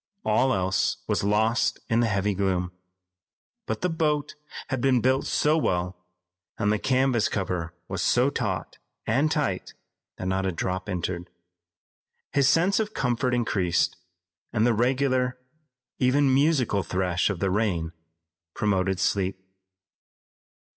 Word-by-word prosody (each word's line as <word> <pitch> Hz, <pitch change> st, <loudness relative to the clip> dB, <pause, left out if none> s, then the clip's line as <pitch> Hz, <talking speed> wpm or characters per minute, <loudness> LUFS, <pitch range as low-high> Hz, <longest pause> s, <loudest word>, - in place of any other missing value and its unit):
All 120 Hz, +5 st, +3 dB
else 95 Hz, -3 st, +1 dB
was -, -, 0 dB
lost 110 Hz, +3 st, +2 dB
in 115 Hz, -, +2 dB
the 120 Hz, -, +3 dB
heavy 100 Hz, -1 st, 0 dB
gloom. 90 Hz, -2 st, -1 dB, 1.0 s
But -, -, -3 dB
the 180 Hz, -, +1 dB
boat 150 Hz, -3 st, 0 dB, 0.4 s
had 130 Hz, -2 st, -1 dB
been 130 Hz, -1 st, +3 dB
built 130 Hz, +3 st, +1 dB
so 150 Hz, +1 st, +2 dB
well 90 Hz, -, -2 dB, 0.5 s
and 105 Hz, -, +1 dB
the 105 Hz, -, 0 dB
canvas 130 Hz, -3 st, +2 dB
cover 90 Hz, -4 st, -3 dB
was 95 Hz, -, -3 dB
so 125 Hz, +3 st, +3 dB
taut 105 Hz, -9 st, -3 dB, 0.3 s
and 135 Hz, +7 st, +2 dB
tight 145 Hz, -12 st, -2 dB, 0.4 s
that -, -, -5 dB
not 95 Hz, +1 st, 0 dB
a -, -, 0 dB
drop 95 Hz, +3 st, -3 dB
entered. 90 Hz, -1 st, -3 dB, 1.0 s
His 140 Hz, -1 st, +4 dB
sense 180 Hz, +6 st, +3 dB
of 215 Hz, 0 st, -2 dB
comfort 125 Hz, 0 st, 0 dB
increased, 95 Hz, -7 st, +1 dB, 0.6 s
and 110 Hz, -1 st, +2 dB
the 120 Hz, -, +3 dB
regular, 130 Hz, +2 st, +1 dB, 0.6 s
even, 135 Hz, +1 st, +3 dB
musical 135 Hz, -7 st, +2 dB
thresh 90 Hz, -1 st, 0 dB
of 105 Hz, -, -2 dB
the 95 Hz, 0 st, 0 dB
rain 90 Hz, -6 st, 0 dB, 0.6 s
promoted 95 Hz, -2 st, 0 dB
sleep. 95 Hz, 0 st, 0 dB
110 Hz, 135 wpm, -26 LUFS, 95-130 Hz, 1.0 s, His